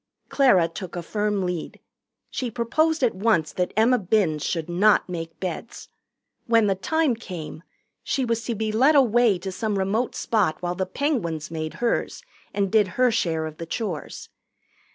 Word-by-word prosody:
Clara 220 -12 +4
took 175 +2 -8
a 175 - -4
firm 210 0 -1
lead. 180 -2 -4 0.5
She 250 - -3
proposed 295 +7 0
at 240 - +3
once 190 -5 +1
that 180 -1 -1
Emma 240 +3 +4
Binns 180 -6 +1
should 165 -3 -2
not 195 +5 +3
make 165 -2 -6
beds. 185 +5 -6 0.6
When 230 -2 +4
the 200 - +3
time 310 +9 +1
came, 180 -8 -7 0.4
she 265 -2 -1
was 230 -1 -1
to 235 - -2
be 215 0 -2
led 265 +8 +4
away 240 -6 +4
to 190 +2 -5
some 205 +2 -2
remote 205 +6 0
spot 200 -9 0
while 175 0 -2
the 185 +1 -2
Penguins 180 - -2
made 155 -1 -4
hers 240 - -1 0.3
and 200 -2 -1
did 215 -3 +4
her 250 -1 +4
share 165 -7 0
of 155 -1 -7
the 165 - -7
chores. 185 -5 -5
205 Hz, 170 wpm, -24 LUFS, 175-235 Hz, 0.6 s, Clara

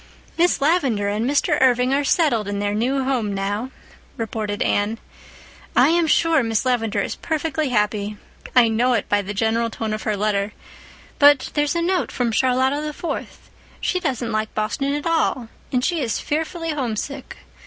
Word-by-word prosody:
"Miss 345 +1 +2
Lavendar 270 - +2
and 215 +5 -1
Mr. 290 +1 +1
Irving 250 0 +3
are 285 +1 +2
settled 275 - +2
in 205 0 -3
their 205 0 -1
new 260 +5 0
home 240 -7 -1
now," 205 +5 -2 0.5
reported 215 -2 -2
Anne. 205 +3 0 0.8
"I - - +6
am 335 0 +2
sure 325 0 +3
Miss 225 0 -1
Lavendar 225 -5 +1
is - - -4
perfectly 310 -2 -2
happy—I 210 +2 0
know 235 +3 +2
it 235 - 0
by 205 0 +2
the 200 +1 -6
general 225 +2 +1
tone 220 -1 -4
of 215 - -3
her 215 -2 -1
letter—but 215 +7 0
there's 295 +1 +1
a 340 - 0
note 365 +1 0
from 245 -2 -1
Charlotta 260 +4 +2
the 305 0 -4
Fourth. 345 +2 -6 0.3
She 365 - 0
doesn't 255 -8 -2
like 215 0 -2
Boston 250 +7 -1
at 295 - -4
all, 315 -8 0 0.2
and 250 -1 +1
she 345 -4 0
is 235 -4 -1
fearfully 325 +2 -2
homesick. 270 0 -4
250 Hz, 165 wpm, -22 LUFS, 215-295 Hz, 0.8 s, I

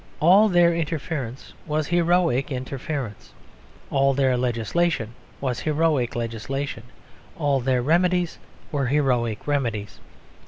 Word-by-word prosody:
All 195 +7 +6
their 175 -2 +4
interference 155 -6 -4
was 155 0 0
heroic 170 -5 +2
interference. 130 -2 -5 0.6
All 135 -1 +3
their 130 -2 +2
legislation 120 +2 0 0.3
was 130 -3 -2
heroic 155 -5 +1
legislation. 120 +4 -3 0.6
All 145 -3 +1
their 125 -1 +1
remedies 175 +3 +1 0.3
were 140 -4 0
heroic 125 -6 0
remedies. 115 -8 -2
140 Hz, 105 wpm, -24 LUFS, 125-165 Hz, 0.6 s, All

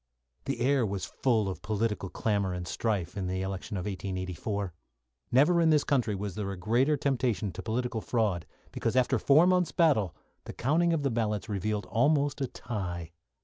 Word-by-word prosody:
The 120 - -2
air 135 +1 +3
was 100 -3 -2
full 115 -6 +1
of 95 - -4
political 105 -2 -1
clamour 100 -3 0
and 90 -1 -5
strife 100 -3 -1
in 95 -3 -2
the 95 +1 -2
election 95 +2 -4
of 90 - -4
1884. 95 0 -3 0.6
Never 150 +7 +5
in 165 - +4
this 150 -2 +4
country 120 -7 +1
was 100 0 -4
there 100 +1 -3
a 95 - -6
greater 120 +11 +2
temptation 125 -7 0
to - - -7
political 120 0 -2
fraud, 100 -5 0 0.2
because, 115 - -2
after 130 -1 +3
four 145 +8 +5
month's 180 -2 +3
battle, 125 - +2 0.3
the - - -7
counting 165 +7 +2
of 160 -3 0
the 140 - +1
ballots 110 -3 -1
revealed 105 +1 -2
almost 145 +4 +2
a 135 - +1
tie. 90 -9 -5
110 Hz, 180 wpm, -29 LUFS, 95-135 Hz, 0.6 s, Never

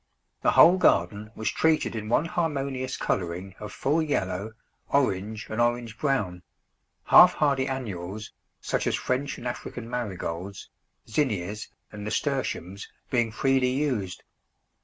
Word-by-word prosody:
The - - +3
whole 180 +3 +8
garden 100 - +2
was 110 -1 -1
treated 160 -6 +2
in 110 -1 -4
one 145 - +3
harmonious 140 -6 -2
colouring 90 +1 -2
of 105 - -7
full 150 +4 +1
yellow, 105 -8 -2 0.4
orange, 110 -6 0
and 110 +2 -1
orange 120 -1 0
brown; 105 -12 0 0.6
half - - +8
hardy 140 -3 +2
annuals, 105 -6 -5 0.3
such - - -1
as - - +2
French 130 +2 -2
and 120 - -10
African 120 -1 -6
Marigolds, 100 -5 -5 0.4
Zinnias, 105 - -1 0.2
and 105 -1 -8
Nasturtiums, 105 - -2 0.2
being 120 -3 +2
freely 135 +2 +2
used. 125 -9 -1
115 Hz, 125 wpm, -27 LUFS, 100-135 Hz, 0.6 s, whole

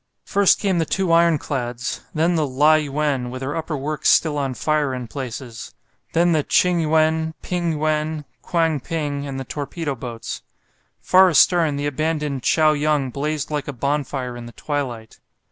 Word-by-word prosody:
First 200 -1 +4
came 190 -4 +1
the 165 - +1
two 190 +1 0
ironclads; 140 -7 +1
then 165 +3 +1
the 155 -3 +1
"Lai 150 +4 +4
yuen," 145 -4 -1
with 130 +1 -6
her 140 +2 -3
upper 160 -2 -3
works 150 +2 -1
still 155 -3 +4
on 135 -3 -2
fire 150 -3 0
in 125 -2 -6
places; 125 -2 -7 0.4
then 170 +1 +3
the 155 -2 +3
"Ching 180 +4 +2
yuen," 160 0 +1
"Ping 175 -2 -1
yuen," 155 0 -1 0.2
"Kwang 165 -3 0
ping," 145 -2 -3
and 135 -1 -5
the - - -4
torpedo 145 +3 -4
boats. 120 -2 -6 0.6
Far 185 0 +6
astern 165 -2 +4
the 145 +1 -3
abandoned 150 -1 -1
"Chao 155 +4 +3
yung" 145 -3 0
blazed 150 +2 -3
like 150 -1 -2
a 145 - -4
bonfire 135 -1 -2
in 120 -1 -8
the 120 - -12
twilight. 125 -7 -4
150 Hz, 165 wpm, -21 LUFS, 135-160 Hz, 0.6 s, Far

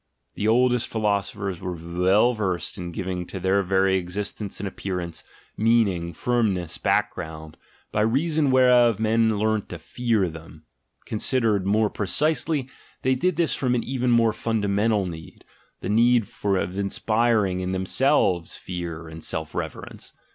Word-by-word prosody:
The 105 - -2
oldest 125 +1 +3
philosophers 100 -3 -1
were 90 -1 -3
well 90 +8 +2
versed 95 -6 -2
in 90 -3 -5
giving 90 +1 -3
to 95 - -6
their 95 +2 +2
very 95 0 +2
existence 100 +3 -4
and 100 - -3
appearance, 90 -4 -5 0.3
meaning, 105 -7 +2
firmness, 100 -8 -1
background, 80 -1 -2 0.4
by 105 - 0
reason 145 +6 +2
whereof 125 -4 +5
men 110 0 +2
learnt 110 0 0
to 90 - -6
fear 110 +3 0
them; 80 -1 -11 0.4
considered 110 -3 0
more 105 +1 +2
precisely, 150 - 0 0.4
they 130 - +3
did 175 +7 0
this 170 0 +2
from 125 -2 0
an 120 - 0
even 125 -1 -1
more 115 -2 +4
fundamental 105 -2 0
need, 80 -3 -9 0.4
the - - -4
need 115 +1 +4 0.2
of 95 -2 0
inspiring 105 -1 +1
in 90 0 -2
themselves 95 - +1
fear 85 -3 -6
and 80 0 -9
self 80 -1 -4
reverence. - - -6
105 Hz, 140 wpm, -24 LUFS, 90-120 Hz, 0.4 s, whereof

